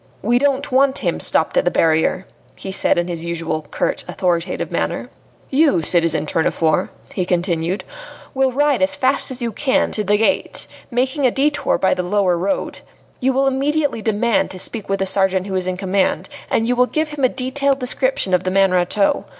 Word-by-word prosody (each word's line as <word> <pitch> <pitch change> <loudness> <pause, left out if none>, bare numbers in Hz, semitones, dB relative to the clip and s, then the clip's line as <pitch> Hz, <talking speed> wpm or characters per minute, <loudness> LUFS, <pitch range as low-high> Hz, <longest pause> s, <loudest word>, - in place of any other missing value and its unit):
"We 240 +4 +2
don't 280 0 0
want 265 +1 +3
him - - 0
stopped - - +1
at - - +4
the - - +2
barrier," 160 +3 +1 0.3
he 190 - -7
said 190 - +2
in 175 0 0
his 170 -2 -5
usual 165 -3 -3
curt, - - -1
authoritative 175 -1 -2
manner. - - -2 0.4
"You, 275 - +3
citizen 165 -1 +1
Tournefort," 160 +2 0 0.2
he 185 - -1
continued, 175 +1 -1 0.5
"will 265 -1 +2
ride 285 -3 +1
as 185 - +2
fast 265 +1 +1
as 255 -1 -6
you 235 - -1
can 265 +5 0
to 210 - -1
the 205 +1 +2
gate, 225 +7 0 0.2
making 260 +3 +1
a - - +3
detour 285 +2 +1
by 190 - +2
the - - -2
lower 185 0 +1
road. 190 +3 -2 0.4
You 265 0 +2
will 270 +1 +1
immediately 275 -1 0
demand 220 +1 +1
to 185 - -8
speak 210 +2 -3
with 195 - +1
the 195 - -1
sergeant 190 -1 +1
who 195 - -5
is 185 -1 -1
in 185 0 -2
command, 190 +5 0 0.2
and 225 - +1
you 250 - +1
will 250 +1 +3
give 310 +2 -1
him 295 -2 -5
a 255 - +5
detailed 270 +2 0
description 255 -6 -1
of 180 0 +3
the 185 - -1
man 195 0 +3
Rateau. 185 +3 +1
205 Hz, 195 wpm, -19 LUFS, 180-265 Hz, 0.5 s, a